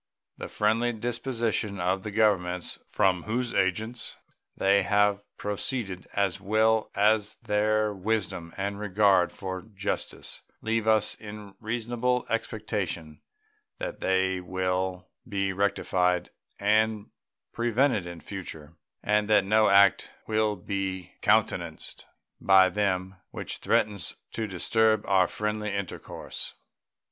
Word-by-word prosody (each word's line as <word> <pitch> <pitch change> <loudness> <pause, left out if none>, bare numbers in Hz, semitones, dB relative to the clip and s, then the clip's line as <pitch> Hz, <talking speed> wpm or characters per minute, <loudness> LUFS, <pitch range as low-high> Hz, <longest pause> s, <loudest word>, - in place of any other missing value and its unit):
The - - -6
friendly 115 +3 +1
disposition 115 -3 -1
of 95 +2 0
the 105 - -5
Governments 95 -5 +1
from 90 -2 +2
whose 120 +2 -1
agents 110 +5 -1 0.4
they 100 +1 +4
have 105 -1 +3 0.2
proceeded, 105 -2 -2
as 100 -2 0
well 110 +2 +2
as 105 +1 +3
their 105 0 +1
wisdom 95 -4 -2
and 100 +1 -3
regard 100 -3 +3
for 95 -1 -5
justice, 105 -1 -4 0.2
leave 110 0 -1
us 110 -1 +3
in 105 -2 -10
reasonable 120 +2 -1
expectation 105 -8 -3 0.6
that - - -5
they 95 0 +1
will 90 0 -2 0.2
be 100 -2 0
rectified 90 -2 +1 0.3
and 105 +1 +2 0.4
prevented 120 -4 +1
in 85 -1 -8
future, 80 -6 -8 0.3
and 105 0 +2
that 105 -2 +5
no 110 +2 +4
act 100 -1 +5 0.2
will 110 -1 +1
be 95 -1 -4
countenanced 90 -6 0 0.3
by 95 -1 +6
them 95 -1 -1
which - - -4
threatens 100 -5 0 0.2
to 110 - -3
disturb 110 +3 +2
our 95 -2 +4
friendly 105 +1 -2
intercourse. 100 -2 -5
100 Hz, 115 wpm, -27 LUFS, 95-110 Hz, 0.6 s, by